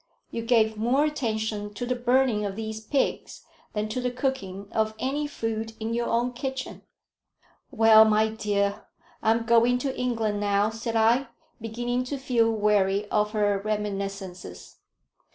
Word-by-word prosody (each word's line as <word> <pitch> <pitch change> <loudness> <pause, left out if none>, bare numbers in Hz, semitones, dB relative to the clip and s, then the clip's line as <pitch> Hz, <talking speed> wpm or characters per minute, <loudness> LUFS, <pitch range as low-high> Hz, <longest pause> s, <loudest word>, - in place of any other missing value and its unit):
You 230 - -3
gave 225 -2 +2
more 250 +7 +2
attention 220 -7 -2
to 245 - -3
the 250 - 0
burning 245 -2 +2
of 200 -1 -3
these 220 0 -5
pigs 270 +5 -2 0.3
than 210 0 -1
to 250 +4 -2
the 250 - 0
cooking 245 -7 -3
of 220 0 0
any 285 +5 -1
food 225 -4 -4
in 225 +1 -3
your 235 0 -1
own 240 +2 0
kitchen." 265 +1 -5 0.9
"Well, 220 -1 +7
my 215 0 +3
dear, 205 -1 -1 0.3
I'm 225 +1 +2
going 235 +1 +4
to 265 +1 -3
England 225 -4 -1
now," 205 +1 +1
said 225 +1 -4
I, 230 +4 +3 0.3
beginning 240 +3 -2
to 280 +2 -4
feel 245 -4 +2
weary 205 -2 +1
of 210 0 +1
her 205 -2 +1
reminiscences. 195 - -5
220 Hz, 150 wpm, -26 LUFS, 210-245 Hz, 0.9 s, Well